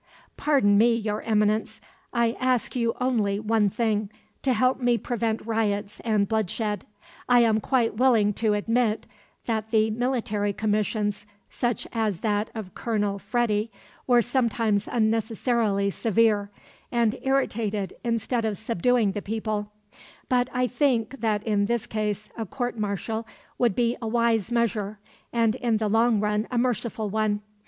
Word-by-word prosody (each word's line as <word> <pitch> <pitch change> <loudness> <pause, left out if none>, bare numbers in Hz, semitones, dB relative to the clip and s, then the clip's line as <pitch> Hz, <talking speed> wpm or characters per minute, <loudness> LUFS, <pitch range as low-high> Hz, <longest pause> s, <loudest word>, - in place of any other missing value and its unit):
"Pardon 250 -9 +3
me, 235 +1 +5
Your 215 -2 -2
Eminence; 215 0 +1 0.3
I 235 -1 +2
ask 255 -1 0
you 235 -1 0
only 220 -6 +1
one 220 -1 +2
thing 215 -1 0 0.3
to 265 - +1
help 255 +3 +2
me 245 -1 +3
prevent 230 -2 -2
riots 210 -2 -1
and 215 -3 +1
bloodshed. 215 -1 -1 0.4
I 245 -1 +6
am 220 -2 +3
quite 230 -1 +1
willing 225 -5 +4
to 215 0 +1
admit 225 +1 0 0.4
that 220 -2 -2
the 220 -1 +2
military 225 -4 -1
commissions, 210 0 -1 0.2
such 240 -2 -1
as 215 -6 -1
that 210 -1 0
of 210 -5 -6
Colonel 205 -3 -1
Freddi, 215 +1 0 0.4
were 240 -2 +5
sometimes 230 -4 0
unnecessarily 220 -2 +1
severe, 215 -1 +2 0.4
and 235 -1 +2
irritated 220 -7 0
instead 235 0 -1
of 215 -3 -1
subduing 225 +1 +1
the 205 - -4
people; 210 -1 -3 0.6
but 250 0 +2
I 250 0 +1
think 250 -1 0
that 215 -2 0
in 205 -2 +1
this 235 -1 -1
case 210 -1 -3
a 225 -2 -4
court 245 +5 -3
martial 220 +1 -3 0.3
would 235 -6 +2
be 240 0 +1
a 225 - -3
wise 230 -1 +1
measure 215 -3 0 0.3
and 230 -2 +2
in 235 -2 0
the 215 -1 -1
long 225 +1 +3
run 210 +1 0
a 250 - -2
merciful 235 -3 -1
one. 215 -1 0
220 Hz, 145 wpm, -25 LUFS, 210-235 Hz, 0.6 s, I